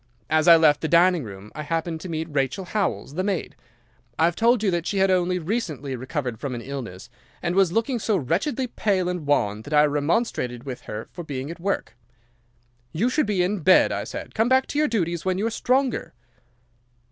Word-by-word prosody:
As 155 +1 +3
I 170 - +10
left 150 -3 +4
the 160 - -1
dining 170 0 +4
room 100 -1 -10
I 150 - -6
happened 165 +1 -3
to 185 - -7
meet 160 0 -3
Rachel 145 +7 -1
Howells, 175 - -2
the 185 +4 -1
maid. 195 -3 -2 0.6
I 160 - +4
have 170 0 +1
told 230 +1 +3
you 200 - +2
that 170 -1 -1
she 200 - -1
had 190 0 +3
only 180 0 +2
recently 160 - -3
recovered 130 -2 -4
from 135 -4 -4
an 120 - -5
illness, 120 -9 -7 0.4
and 170 0 0
was 190 -2 +3
looking 230 +5 0
so 215 -1 +1
wretchedly 195 - -1
pale 200 -6 0
and 180 -5 -3
wan 105 -7 +1
that 145 +6 -3
I 150 - +7
remonstrated 145 - -1
with 130 -3 -6
her 105 +1 -5
for 175 - -7
being 140 -1 -5
at 170 - -9
work. 195 +3 -2 1.0
"'"You 230 +10 0
should 305 -4 +1
be 195 -4 +1
in 195 +3 -1
bed," 185 +3 +5
I - - -2
said. - - -7
"Come 225 +2 +1
back 260 0 +4
to 290 - -1
your 305 - +3
duties 170 -7 -1
when 185 -1 0
you 205 - -1
are 230 - 0
stronger." 255 +2 0
170 Hz, 210 wpm, -24 LUFS, 145-200 Hz, 1.0 s, I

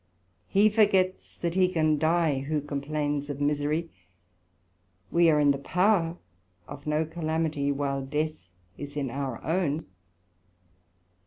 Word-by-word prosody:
He 205 +2 +4
forgets 200 -4 +2
that 170 -1 -2
he 185 0 +4
can 155 -4 +1
dye 160 -3 +2
who 150 +3 -1
complains 145 0 -2
of 140 -1 -4
misery; 150 +3 0 1.2
we 170 -1 +5
are 150 -1 +4
in 145 -1 +5
the 140 - -1
power 180 +1 +2 0.5
of 140 - -10
no 150 +1 +1
calamity 160 -3 -1
while 140 -1 -1
death 150 - -3 0.3
is 145 0 -7
in 135 -4 -2
our 135 -3 -4
own. 160 -2 0
155 Hz, 130 wpm, -27 LUFS, 145-170 Hz, 1.2 s, we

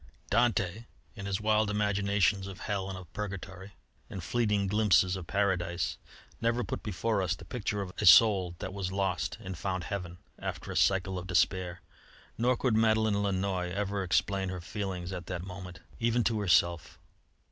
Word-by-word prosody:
Dante, 115 -2 +1 0.3
in 100 -2 -6
his 95 -1 -1
wild 110 0 +2
imaginations 100 -1 +1
of 95 -1 -9
hell 100 -2 -2
and 95 - -5
of 90 -3 -12
purgatory 100 -1 -6 0.4
and 95 - -6
fleeting 105 0 +1
glimpses 95 -3 +3
of 90 -3 -7
paradise, 90 -3 0 0.4
never 115 +1 +1
put - - -4
before 105 +1 -1
us 95 0 0
the - - -12
picture 105 -4 -2
of 90 - -8
a - - +3
soul 95 -2 +7
that 95 - -6
was 95 -2 -3
lost 95 -2 -1
and 95 0 -6
found 95 -1 -2
heaven, 90 -1 -5 0.2
after - - -5
a - - -5
cycle 95 -1 +2
of 90 - -8
despair. 90 -1 +1 0.5
Nor 125 +2 +2
could 125 -3 +1
Madeleine 110 -2 +3
Lannoy 95 -2 -1
ever 100 +1 -2
explain 95 +1 +1
her 90 -1 -4
feelings 95 -1 -4
at 90 -2 -6
that 90 -1 -4
moment, 90 -2 -9 0.2
even 115 +1 +2
to 110 -2 +1
herself. 85 -3 +2
95 Hz, 170 wpm, -30 LUFS, 90-105 Hz, 0.5 s, soul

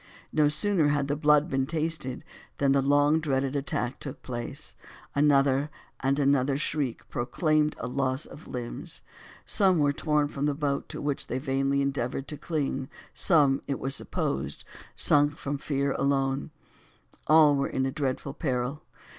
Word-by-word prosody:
No 150 -1 +4
sooner 160 +2 +3
had 145 -1 +1
the 145 - 0
blood 150 0 +4
been 135 -4 0
tasted 155 -5 -3 0.3
than 140 -1 +2
the 140 0 +4
long 145 +3 +3
dreaded 135 -3 -1
attack 140 -3 -2
took 140 - -8
place; 120 -2 -5 0.4
another 140 -1 +3 0.3
and 135 +1 +1
another 140 -1 +2
shriek 145 -4 -2
proclaimed 150 +5 0
a - - -5
loss 130 +2 -1
of 155 - -12
limbs; 120 -1 -6 0.4
some 190 -3 +3
were 145 -2 +3
torn 150 0 +1
from 145 0 -2
the 145 - 0
boat 140 -2 -2
to - - -6
which 145 -1 -2
they 125 - -2
vainly 135 +1 0
endeavored 135 -1 -2
to 150 - -4
cling; 140 -5 -2 0.2
some, 145 -7 +4
it 140 - -1
was 135 +1 -2
supposed, - - -3 0.3
sunk 145 0 +4
from 140 -2 -4
fear 140 -1 -1
alone; 135 +1 0 0.8
all 155 -1 +6
were 140 0 0
in 130 - -1
dreadful 135 -1 -3
peril. 130 0 -2
140 Hz, 155 wpm, -27 LUFS, 135-150 Hz, 0.8 s, all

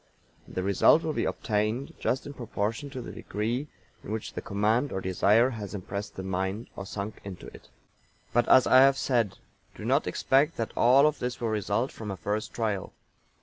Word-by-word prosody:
And - - -13
the 95 - -1
result 100 - +5
will 155 - -1
be - - -1
obtained 110 +4 -1
just 130 - -1
in 145 - -7
proportion 115 +2 -3
to 130 -2 -6
the - - -7
degree 115 +8 -3 0.4
in - - -7
which 110 0 -4
the - - -4
command 110 +7 +1
or 95 - -2
desire 105 +6 +3
has 105 -3 -6
impressed 100 +1 -5
the 95 - -5
mind, 95 +4 -3
or 95 - -7
sunk 100 +1 -5
into 100 -3 -8
it. - - -15 0.6
But, 120 0 +2
as 130 - +7
I 130 - +6
have 135 +1 +6
said: 115 -9 0 0.4
Do - - -8
not - - +2
expect 145 +5 +2
that 115 - -3
all 130 +4 +6
of 150 -1 +1
this 125 0 -3
will 115 - -1
result 110 +4 0
from 110 -2 -7
a 95 - -4
first 105 +3 -3
trial. 105 -5 -2
110 Hz, 195 wpm, -28 LUFS, 100-130 Hz, 0.6 s, as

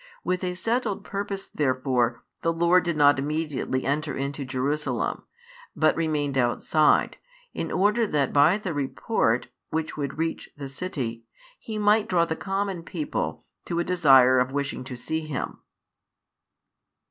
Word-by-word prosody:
With 180 +1 -1
a 180 -1 -2
settled 225 +2 -1
purpose 200 -1 -4
therefore 130 -3 0 0.2
the 165 - +1
Lord 170 +2 +3
did 170 -3 -1
not 145 -2 +5
immediately 145 -3 -2
enter 145 +1 -1
into 140 +1 -3
Jerusalem, 135 +3 -2 0.5
but 155 - +3
remained 150 -4 0
outside, 130 +5 +2 0.4
in - - -4
order 210 +5 +2
that 145 -7 0
by 150 +7 +5
the 190 -5 -4
report 135 - 0 0.2
[which 160 -1 -3
would 140 -1 -3
reach 165 0 -2
the 140 -1 -6
city] 130 -8 -4 0.3
He 220 -1 -6
might 210 +1 +3
draw 170 -2 +3
the 160 - -2
common 195 -1 -2
people 165 -2 -4 0.2
to 170 - -3
a 170 - +2
desire 135 -8 +5
of 125 +1 +1
wishing 140 -2 -2
to 130 - -6
see 160 +6 -3
Him. 155 -4 -5
155 Hz, 145 wpm, -26 LUFS, 135-180 Hz, 0.5 s, not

